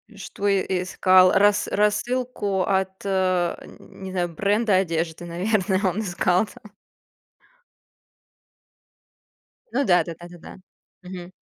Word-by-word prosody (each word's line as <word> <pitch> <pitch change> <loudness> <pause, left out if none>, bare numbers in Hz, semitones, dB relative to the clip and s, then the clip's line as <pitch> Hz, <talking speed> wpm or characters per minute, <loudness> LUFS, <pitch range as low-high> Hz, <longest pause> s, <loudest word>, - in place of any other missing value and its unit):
Что 200 +1 -5
и 195 -1 +2 0.2
искал? 185 0 +4
Рас 205 +1 +3
рассылку 210 -1 0
от, 190 0 0
э, 185 -3 0 0.2
не 190 -1 -11
знаю, 180 -2 -1
бренда 205 +5 +1
одежды, 170 -2 -2
наверно, 190 +2 0
он 200 +4 -3
искал 180 0 +1
там. 210 -1 -16 3.0
Ну 280 - 0
да 180 -4 +4
да 170 - -7
да 175 - -10
да 175 0 -13
да, 170 - -12 0.5
мгм. 180 -1 -9
190 Hz, 115 wpm, -23 LUFS, 180-205 Hz, 3.0 s, искал